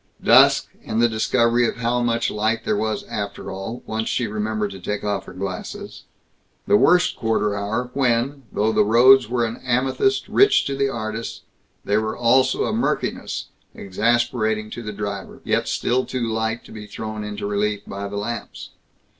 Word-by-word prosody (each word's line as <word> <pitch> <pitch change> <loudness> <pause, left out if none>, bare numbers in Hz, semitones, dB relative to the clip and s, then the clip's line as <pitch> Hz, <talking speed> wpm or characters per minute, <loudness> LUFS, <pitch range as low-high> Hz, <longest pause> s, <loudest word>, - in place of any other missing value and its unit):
Dusk, - - +6
and 110 - -2
the 120 - +5
discovery 115 +1 +2
of - - -3
how 120 +1 0
much 115 -1 0
light 110 +2 -1
there 110 - +1
was 110 +1 -1
after 100 -1 -5
all, 95 +6 -6
once 110 0 -2
she 125 - 0
remembered 105 -1 -2
to 95 - -9
take 105 +3 -4
off 100 -2 -2
her - - -10
glasses. 205 - -6 0.6
The 205 - +4
worst 180 -3 +4
quarter 110 -2 0
hour 110 +5 -2
when, 135 +1 +1
though 110 +2 +1
the - - +3
roads 120 +3 +6
were 120 -1 +1
an 115 +1 -4
amethyst 130 - 0
rich 410 +1 +4
to 140 - -2
the 135 0 +1
artist, 110 -2 -5 0.4
they 105 - +2
were 110 0 -2
also 125 +2 +3
a - - -1
murkiness - - -2 0.3
exasperating 110 +1 0
to 120 - -6
the 105 -2 -5
driver, 100 -1 -6
yet - - 0
still 125 +2 0
too 125 -2 -2
light 110 +1 -2
to - - -14
be 105 -1 -9
thrown 110 +1 -6
into 105 -1 -5
relief 105 0 -1
by 100 +1 -5
the 100 +1 -5
lamps. 115 +4 -5
110 Hz, 175 wpm, -22 LUFS, 105-120 Hz, 0.6 s, Dusk